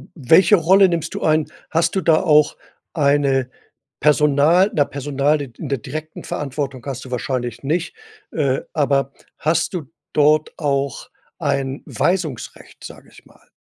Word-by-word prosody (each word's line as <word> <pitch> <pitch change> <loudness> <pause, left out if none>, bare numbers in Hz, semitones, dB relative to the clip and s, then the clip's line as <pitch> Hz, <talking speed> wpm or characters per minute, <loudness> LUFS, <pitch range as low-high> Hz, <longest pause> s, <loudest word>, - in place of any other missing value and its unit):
welche 165 - +5
Rolle 190 +3 +5
nimmst 170 -2 -3
du - - -4
ein? 155 -1 +2 0.2
Hast 165 +3 0
du 190 - +1
da 160 -1 +3
auch 150 -4 +3 0.4
eine 140 -4 +2 0.5
Personal 150 +5 +4
na, 145 - +3
Personal 145 +2 -1
in 130 -4 -8
in 150 - -6
der 140 - 0
direkten 155 +4 -7
Verantwortung 135 -3 -5
hast 135 -2 -6
du 130 - -11
wahrscheinlich 125 -1 -3
nicht, 165 +5 -2 0.4
äh, 140 -4 0
aber 140 -2 0 0.2
hast 160 +3 0
du 155 -7 -5 0.2
dort 150 +1 +3
auch 140 -3 -2 0.3
ein 140 -3 -2
Weisungsrecht, 170 - -3
sage - - -12
ich - - -18
mal. - - -24
145 Hz, 145 wpm, -20 LUFS, 135-160 Hz, 0.5 s, welche